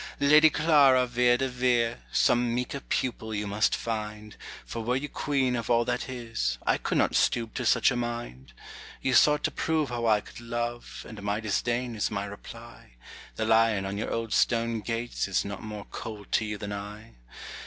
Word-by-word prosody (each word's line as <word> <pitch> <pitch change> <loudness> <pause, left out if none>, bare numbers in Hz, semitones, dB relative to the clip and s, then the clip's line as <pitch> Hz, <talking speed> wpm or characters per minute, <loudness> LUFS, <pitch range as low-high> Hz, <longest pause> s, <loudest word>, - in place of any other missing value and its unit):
Lady 150 +2 +7
Clara 140 -5 +4
Vere 120 0 +3
de 135 - 0
Vere, 125 - +1
Some 120 - +2
meeker 125 +3 -3
pupil 110 -5 -3
you 105 0 -2
must 105 +2 +1
find, 105 -1 -5 0.3
For 115 - -5
were 125 +3 0
you 140 +3 -2
queen 135 -4 0
of 115 -2 -4
all 120 -1 +3
that 125 +2 -2
is, 115 - -3
I - - +2
could - - -1
not - - +2
stoop 115 -2 +1
to 125 -3 -2
such - - +4
a - - -1
mind. 120 - -5 0.5
You 130 - +1
sought 150 +3 +5
to - - +1
prove 155 -4 0
how 120 -1 -2
I 105 -1 +4
could - - -12
love, 120 0 -5
And 110 -2 -9
my 100 +1 -1
disdain 120 +2 -1
is 105 - 0
my 100 -1 -3
reply. 115 - -11 0.4
The 110 - -2
lion 110 -3 +3
on 95 +1 -3
your 105 - -3
old 115 -1 -2
stone 115 -1 +2
gates 115 +1 -3
Is 100 - 0
not 100 -1 -6
more 105 -1 -7
cold 105 -2 -8
to 110 - +2
you 105 -1 -4
than 100 0 -5
I. 105 +2 -8
115 Hz, 190 wpm, -27 LUFS, 105-125 Hz, 0.5 s, Lady